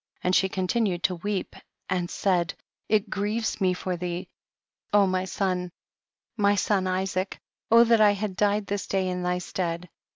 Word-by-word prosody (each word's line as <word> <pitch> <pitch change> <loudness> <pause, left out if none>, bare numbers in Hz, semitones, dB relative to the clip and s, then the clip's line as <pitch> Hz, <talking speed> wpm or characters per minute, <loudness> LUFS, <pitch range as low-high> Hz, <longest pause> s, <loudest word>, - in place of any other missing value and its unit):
And 180 +1 +2
she 190 - +3
continued 185 -1 0
to 185 - +2
weep 200 +2 -3 0.3
and 175 -1 -1
said, 180 -4 0 0.3
it 210 -2 +2
grieves 210 +2 -1
me 185 -1 +3
for 180 0 -3
thee, 175 0 -4 0.6
O 205 -1 +5
my 185 0 0
son, 180 -1 -1 0.6
my 205 -2 +3
son 195 -1 +1
Isaac, 185 +1 -1 0.3
that 230 0 +6
I 205 -1 +6
had 200 -1 -3
died 205 +1 +1
this 200 0 -3
day 190 -1 0
in 180 0 -2
thy 180 0 0
stead. 180 -1 -3
190 Hz, 160 wpm, -26 LUFS, 180-205 Hz, 0.6 s, that